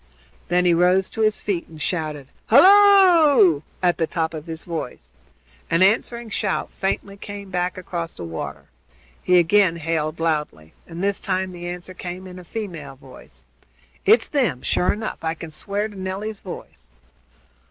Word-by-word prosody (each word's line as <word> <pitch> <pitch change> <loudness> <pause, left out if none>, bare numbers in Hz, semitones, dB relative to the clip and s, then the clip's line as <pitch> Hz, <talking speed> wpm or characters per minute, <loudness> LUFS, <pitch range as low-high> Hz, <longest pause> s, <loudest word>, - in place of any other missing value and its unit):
Then 180 +1 +2
he 175 - +4
rose 180 +2 +3
to 225 - -4
his 215 -1 +2
feet 190 -5 -2
and 160 -1 -13
shouted 150 -5 -3 0.2
"Halloo!" 335 - +6 0.2
at 175 -1 +2
the 165 - +1
top 160 0 -2
of 155 +1 -7
his 165 0 -6
voice. 160 - -6 0.6
An 165 +2 +3
answering 230 +3 +1
shout 200 -1 -2
faintly 195 +1 -3
came 200 -1 -9
back 180 0 -1
across 170 -2 -5
the - - -7
water. 75 -4 -6 0.6
He 180 - +3
again 175 +1 +4
hailed 160 -1 -2
loudly, 150 - -2
and 170 +2 -6
this 200 0 0
time 185 -1 -2
the 175 -1 -8
answer 180 +1 -7
came 180 +1 -7
in 180 -1 -10
a - - -11
female 170 -8 -7
voice. 130 - -16 0.6
"It's 220 +3 +4
them, 230 - 0
sure 180 - +1
enough. 215 +1 -5
I 160 0 -2
can 165 0 -9
swear 200 +6 -2
to 210 - -13
Nelly's 195 +3 -5
voice." 60 - -10
180 Hz, 165 wpm, -22 LUFS, 160-200 Hz, 0.6 s, Halloo